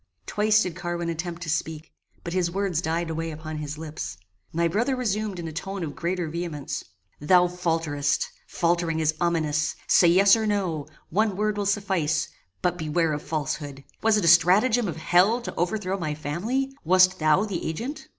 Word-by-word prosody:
Twice 215 +1 +3
did 180 -3 -4
Carwin 175 -1 -3
attempt 170 +1 -4
to 165 - -5
speak, 160 0 -3 0.3
but 170 - -5
his 180 -2 +1
words 185 -2 -1
died 165 0 -1
away 165 +1 -3
upon 155 0 -6
his 150 0 -5
lips. 150 - -6 0.3
My 170 +1 +1
brother 230 +10 0
resumed 215 -5 -2
in 170 -1 -5
a - - -5
tone 190 +4 -5
of 150 -3 -5
greater 180 -1 -2
vehemence 160 -3 -4 0.4
"Thou 180 +4 +5
falterest; 165 -5 -1 0.2
faltering 170 -1 0
is 155 -1 +2
ominous; 155 -3 +1
say 175 - +5
yes 195 +4 +6
or 220 -1 -1
no: 180 -8 -1 0.2
one 210 +2 +1
word 210 0 0
will 205 -1 -1
suffice; 185 -6 0 0.3
but 180 -1 0
beware 160 0 +1
of 150 - -3
falsehood. 145 -3 -4 0.2
Was 220 -1 +4
it 205 - 0
a - - +2
stratagem 200 +8 +5
of 170 - -3
hell 185 +8 +3
to 240 - -6
overthrow 190 +2 -1
my 155 -4 -2
family? 215 - -2
Wast 185 +2 +4
thou 155 +6 +3
the 195 -5 -4
agent?" 235 - -4
170 Hz, 180 wpm, -25 LUFS, 160-195 Hz, 0.4 s, yes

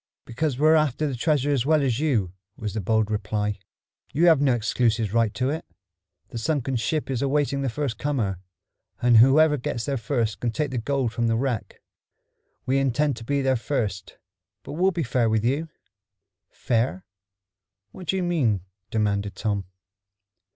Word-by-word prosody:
"Because 130 +2 -2
we're 155 +3 +5
after 155 -2 +2
that 135 -5 -3
treasure 145 0 +1
as 135 -5 +1
well 155 +1 +3
as 125 -3 0
you," 115 - 0 0.2
was 105 -3 -4
the 110 - -2
bold 110 +2 +1
reply. 105 -1 -2 0.5
"You 160 +5 +2
have 160 -5 +6
no 135 -4 +3
exclusive 110 -1 0
right 115 -2 +2
to 130 +2 0
it. 160 +2 -3 0.7
The 115 - -5
sunken 135 0 -1
ship 135 +5 -1
is 125 - -1
awaiting 140 0 +1
the 135 - 0
first 125 -2 -3
comer, 115 -11 -1 0.6
and 120 -1 +5
whoever 150 +6 +6
gets 120 -2 -3
there 140 -1 -1
first 115 -3 -1
can 120 - -1
take 135 +5 -2
the 125 - -1
gold 130 -1 -1
from 115 0 0
the 115 - +2
wreck. 125 -2 -3 0.8
We 135 +2 +2
intend 135 +1 +1
to 115 - -8
be 140 +3 0
there 130 0 +2
first, 110 -6 -3 0.5
but - - -8
we'll 180 +5 +3
be 170 -3 -2
fair 120 -2 +1
with 110 0 +1
you." 145 +6 0 0.8
"Fair? 115 -5 -1 0.9
What 180 +6 -11
do 190 - +1
you 190 - 0
mean?" 135 - +1 0.3
demanded 100 -2 -1
Tom. 100 -3 -2
125 Hz, 170 wpm, -25 LUFS, 110-145 Hz, 0.9 s, have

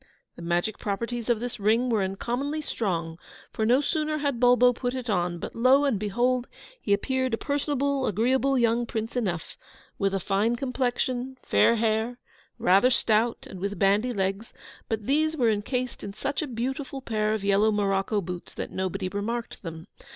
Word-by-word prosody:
The - - -11
magic 175 +5 -1
properties 230 +3 -3
of 235 -2 +3
this 245 -1 -5
ring 225 +5 +2
were 220 -3 +2
uncommonly 245 +10 -2
strong, 170 - -2 0.3
for 220 - -1
no 250 +4 +5
sooner 305 +1 0
had 285 -5 -1
Bulbo 245 0 +5
put 245 +1 -3
it 250 -3 -3
on, 175 -2 0
but - - -6
lo 260 +5 +4
and 250 -8 +1
behold, 240 +4 0 0.3
he 205 - -3
appeared 260 +4 +1
a - - -13
personable, 280 -1 0
agreeable 260 +6 +2
young 235 0 +2
Prince 225 +1 -4
enough 185 -9 -2 0.4
with 195 -1 +1
a - - 0
fine 205 +5 +1
complexion, 255 0 -2
fair 235 - +4
hair, 225 +2 0 0.4
rather 195 +7 +4
stout, 230 -2 +1
and 190 - -9
with 200 +2 -3
bandy 205 +5 +3
legs; 195 +1 -2 0.4
but 220 -2 -2
these 310 +4 +1
were 235 -5 +3
encased 245 +4 -2
in 200 - -6
such 265 +6 -2
a 310 - -3
beautiful 265 +3 -4
pair 215 -2 0
of 210 - -5
yellow 200 +2 +3
morocco 200 0 +1
boots 180 -1 -7
that - - -5
nobody 185 0 -2
remarked 225 +5 -4
them. 165 -2 -7
230 Hz, 175 wpm, -26 LUFS, 200-255 Hz, 0.4 s, no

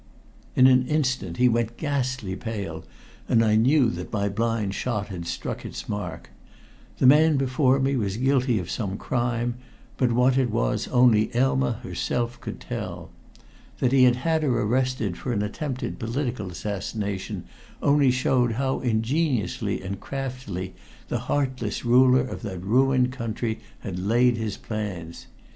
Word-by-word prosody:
In 130 - +6
an 130 -1 +5
instant 130 - 0
he 125 - +5
went 115 -1 0
ghastly 130 -9 -2
pale, 110 -2 -5 0.5
and 115 -1 +4
I 105 -1 +3
knew 125 +2 +4
that - - -6
my 100 -2 0
blind 110 -1 -1
shot 105 -2 -2
had 85 -3 -6
struck - - -4
its - - -7
mark. 105 0 -5 0.7
The - - +1
man 150 +3 +6
before 135 0 +2
me 135 +1 +1
was 100 -5 -1
guilty 130 -2 +2
of 90 -3 -4
some 100 -4 -3
crime, 120 0 -1 0.4
but 125 -2 +2
what 125 +2 +3
it 130 -2 +1
was - - 0
only 120 -4 +4
Elma 120 - +2
herself 120 0 -2
could - - -6
tell. - - -6 0.7
That 125 - +1
he 130 -1 +6
had 125 -1 +5
had 160 +5 0
her 125 -6 +1
arrested 120 -4 0
for 125 - -2
an 105 -2 0
attempted 130 +5 -4
political 115 -3 -3
assassination 100 +1 -4 0.4
only 145 -1 +4
showed 125 -1 +2
how 130 +3 -1
ingeniously 125 - 0
and 100 +1 -5
craftily 125 -10 -5 0.4
the - - -1
heartless 130 -6 -1
ruler 125 +1 +5
of 130 - -5
that 95 -6 -6
ruined 125 +4 +3
country 115 -3 -3 0.2
had 90 -4 -5
laid 120 +5 +3
his 110 -3 -3
plans. 95 -7 -6
120 Hz, 150 wpm, -25 LUFS, 105-130 Hz, 0.7 s, In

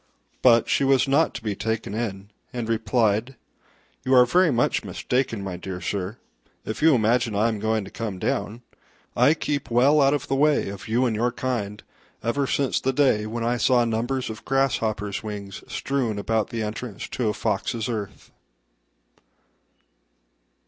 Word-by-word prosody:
But 120 -2 +5
she - - +2
was 135 0 +3
not 145 +4 +2
to - - -6
be 105 -3 -2
taken 110 -1 -3
in, 105 -3 -4 0.2
and 120 -2 -4
replied, 115 +1 +1 0.7
"You 130 0 +3
are 125 -1 +8
very 180 +7 +4
much 120 -4 +1
mistaken, 125 -5 -2
my 95 -2 -5
dear 90 0 -6
sir, 95 +4 -3 0.5
if 110 - -5
you 160 -2 +6
imagine 115 0 +1
I 110 +3 +3
am 110 -2 -3
going 110 -1 0
to - - -11
come 110 -5 -4
down: 105 +5 -2 0.5
I 130 +6 +5
keep 145 -3 -3
well 135 +6 +4
out 140 +1 +4
of 145 0 -4
the 135 - -1
way 145 -5 +2
of 100 +2 -8
you 120 +4 +2
and 115 -3 0
your 120 +3 +1
kind 105 -5 -3 0.4
ever 135 +4 0
since 140 0 0
the 135 - 0
day 125 -6 +2
when 115 +1 -4
I 120 +1 +1
saw 120 0 +3
numbers 120 +2 -1
of 110 - -10
grasshoppers' 110 -7 0
wings 100 -2 -7
strewn 130 -6 -1
about 110 +1 0
the 115 -2 -3
entrance 110 +1 -5
to 120 -4 -1
a - - 0
fox's 110 +4 -1
earth." 110 -5 -5
115 Hz, 170 wpm, -24 LUFS, 105-130 Hz, 0.7 s, are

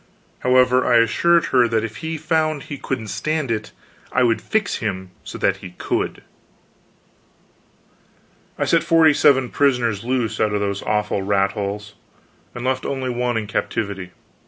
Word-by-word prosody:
However, 125 0 +4
I 120 - +4
assured 165 +10 +3
her 125 -2 +5
that 110 -1 0
if 110 0 -5
he 160 +3 -4
found 155 -1 0
he 145 - -7
couldn't 115 -5 -4
stand 155 -1 -2
it 105 -1 -3 0.4
I 125 - +2
would 115 -2 +2
fix 215 -1 -1
him 95 -4 -4
so - - -8
that 100 0 +1
he 90 -2 -11
could. - - -2 2.3
I - - 0
set - - +3
forty 160 -2 +5
seven 130 -3 +4
prisoners 120 -7 +1
loose 120 -3 -1
out 105 -1 +1
of - - +1
those 100 -1 -2
awful 105 -1 -1
rat 100 0 +1
holes, 105 0 -5 0.6
and 120 +1 -5
left 130 0 0
only 130 -2 -2
one 120 -1 -1
in 110 - -2
captivity. 100 -2 -3
120 Hz, 155 wpm, -21 LUFS, 105-135 Hz, 2.3 s, her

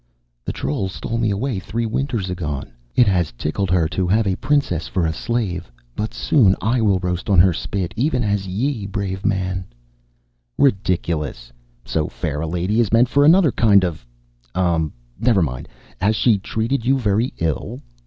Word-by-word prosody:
"The - - -2
troll 75 +8 -2
stole 115 +5 -4
me 115 -2 +1
away 105 +2 -1
three 115 +5 -3
winters 115 -5 -2
agone. 75 -7 -4 0.2
It 125 - +6
has 90 - +1
tickled 80 +10 -2
her 85 -3 +3
to 90 +1 -1
have 110 +4 +2
a 95 -2 +1
princess 130 - 0
for 90 -3 0
slave 90 - -3 0.2
but 105 +1 -3
soon 105 -10 +3
I 115 +5 +1
will 100 -4 +3
roast 90 +1 -3
on 100 - +4
her 90 +1 +6
spit, 90 +1 -3
even 125 +1 +1
as 100 -2 -1
ye, 110 +3 -2
brave 100 -2 -3
man 95 -1 -1 0.5
" - - -46
"Ridiculous. 85 - -3 0.3
So 75 +3 -1
fair 75 +1 -4
a 80 - -2
lady 90 +6 0
is 115 -4 +2
meant 115 +2 +4
for 140 +1 +3
another 165 0 +6
kind 100 -5 +4
of, 85 -6 -4 0.5
um, 85 -4 +1 0.3
never 115 -5 +3
mind! 65 -5 -4 0.3
Has 105 +3 +2
she 110 -2 +3
treated 115 +5 -2
you 135 +3 +3
very 110 0 +1
ill?" 80 -2 -2
95 Hz, 175 wpm, -21 LUFS, 85-115 Hz, 0.5 s, It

